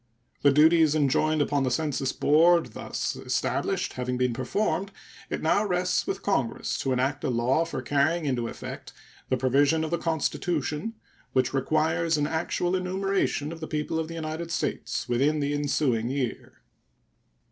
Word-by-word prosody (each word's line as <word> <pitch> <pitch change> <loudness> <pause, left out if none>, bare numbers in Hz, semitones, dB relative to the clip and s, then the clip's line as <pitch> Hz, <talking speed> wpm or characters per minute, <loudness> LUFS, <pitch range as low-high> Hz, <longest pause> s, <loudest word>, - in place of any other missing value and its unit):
The 140 - +5
duties 155 +1 +5
enjoined 155 +1 +2
upon 145 -1 0
the 130 - +1
census 135 0 -1
board 170 +3 +4
thus - - -3
established - - -1
having 125 0 -2
been 125 -1 +1
performed, 190 - -1 0.4
it - - -3
now 180 +6 +3
rests 180 - 0
with 390 - -3
Congress 135 - -1
to 135 - -1
enact 130 +3 0
a - - 0
law 125 +6 +2
for 165 - -5
carrying 155 +4 +1
into 125 -4 -1
effect - - -8 0.4
the 130 - +2
provision 140 +5 +3
of 160 - -3
the 170 - 0
Constitution 165 +3 -2 0.4
which 130 0 +1
requires 160 +4 +1
an 145 - +1
actual 170 +3 -1
enumeration 185 -4 -1
of 165 - -8
the 160 - -5
people 155 +1 -2
of 160 - -2
the 165 - -7
United 160 +1 -4
States - - -2
within 140 +6 +2
the 145 0 -1
ensuing 140 -5 0
year. 130 -2 -4
150 Hz, 160 wpm, -27 LUFS, 135-165 Hz, 0.4 s, The